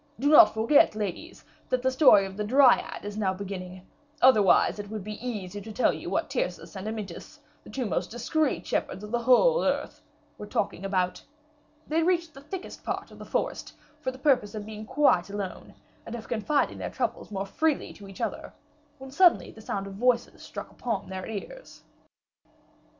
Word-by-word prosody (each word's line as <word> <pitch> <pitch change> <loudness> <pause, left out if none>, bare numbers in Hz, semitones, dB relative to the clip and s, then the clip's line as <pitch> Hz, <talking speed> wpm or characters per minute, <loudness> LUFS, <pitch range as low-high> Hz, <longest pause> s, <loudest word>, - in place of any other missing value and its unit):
Do 285 - +2
not 295 - +8
forget, 225 +2 +4
ladies, 215 - -5 0.2
that 255 -1 0
the 260 - +2
story 260 -8 +6
of 190 0 -8
the 210 - -2
Dryad 255 -1 +4
is 205 0 -6
now 190 -3 0
beginning, 185 -1 -7 0.3
otherwise 215 -6 +5
it 205 -1 -6
would 215 -2 -5
be 210 +3 -7
easy 205 -5 -5
to 220 +2 -9
tell 245 - +2
you - - -6
what - - 0
Tyrcis - - -3
and 190 +2 -6
Amyntas, 220 - -7 0.2
the - - -13
two 260 -2 -3
most 185 -3 -2
discreet 275 +5 -1
shepherds 190 - -2
of 210 - -8
the 240 - +1
whole 370 - +4
earth, 285 +1 -1 0.4
were 210 - -7
talking 195 -2 -2
about. 185 -2 -1 0.6
They 320 +2 +1
reached 340 -1 +1
the 275 - -12
thickest 360 +6 -8
part - - -4
of - - -14
the - - -8
forest, - - -3 0.3
for 260 - -2
the 260 - -7
purpose 260 -7 +2
of 210 -1 -5
being 215 0 -8
quite 205 -12 +3
alone, 200 -2 -6 0.3
and 230 - -7
of 225 -2 -8
confiding 245 +6 0
their - - -4
troubles - - -3
more 195 -1 -3
freely 310 +9 -1
to 200 - -12
each 195 -1 -10
other, - - -4 0.4
when 265 -1 -10
suddenly 350 +4 +4
the 220 - -14
sound 200 -2 -3
of 195 - -8
voices 240 +3 0
struck - - -8
upon 230 -6 -4
their 190 -1 -5
ears." 360 - -8
220 Hz, 190 wpm, -27 LUFS, 200-275 Hz, 0.6 s, not